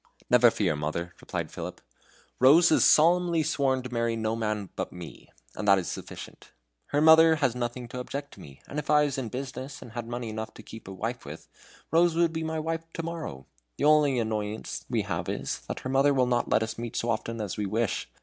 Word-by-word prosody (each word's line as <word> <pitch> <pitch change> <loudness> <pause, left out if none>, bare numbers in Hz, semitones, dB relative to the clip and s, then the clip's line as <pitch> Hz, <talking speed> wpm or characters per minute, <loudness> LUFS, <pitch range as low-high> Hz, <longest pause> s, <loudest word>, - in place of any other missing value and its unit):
"Never 120 -1 +7
fear, 95 -8 0
mother," 80 +4 -3
replied - - -4
Philip; - - -6 0.6
"Rose 155 +7 +7
has - - +4
solemnly 170 +1 +4
sworn 135 -4 0
to 125 -1 -7
marry 115 -1 0
no 110 0 -1
man 105 -3 -2
but - - -4
me; 90 -2 -10 0.3
and 105 - -4
that 100 -1 +7
is 90 - -2
sufficient. - - -9 0.4
Her 145 - +1
mother 160 +1 +7
has 140 -6 +1
nothing 120 0 -4
to 125 - -6
object 140 +3 -6
to - - -15
me. 70 -2 -13
And 150 - -4
if 150 - -7
I 150 0 +5
was 140 -1 -2
in 120 -4 -4
business 130 +2 -6
and 120 - -11
had 120 0 -5
money 120 -1 -4
enough 110 0 -6
to - - -11
keep 110 - -11
a - - -7
wife 115 +5 -4
with, - - -10 0.4
Rose 170 +1 +4
would 170 -1 +2
be 160 - -2
my 160 0 -2
wife 165 +1 -2
to 165 - -4
morrow. 160 - -6 0.3
The - - -3
only 150 -3 +5
annoyance 110 -2 -3
we - - 0
have - - -3
is, - - -3
that - - -5
her 130 - -5
mother 140 +1 +4
will 130 -1 +3
not 120 -1 0
let 110 - +3
us 110 0 -5
meet 120 0 -5
so 115 - 0
often 115 +1 -3
as 105 -3 -3
we 105 -1 -2
wish. 110 +1 -1
125 Hz, 225 wpm, -27 LUFS, 110-150 Hz, 0.6 s, Never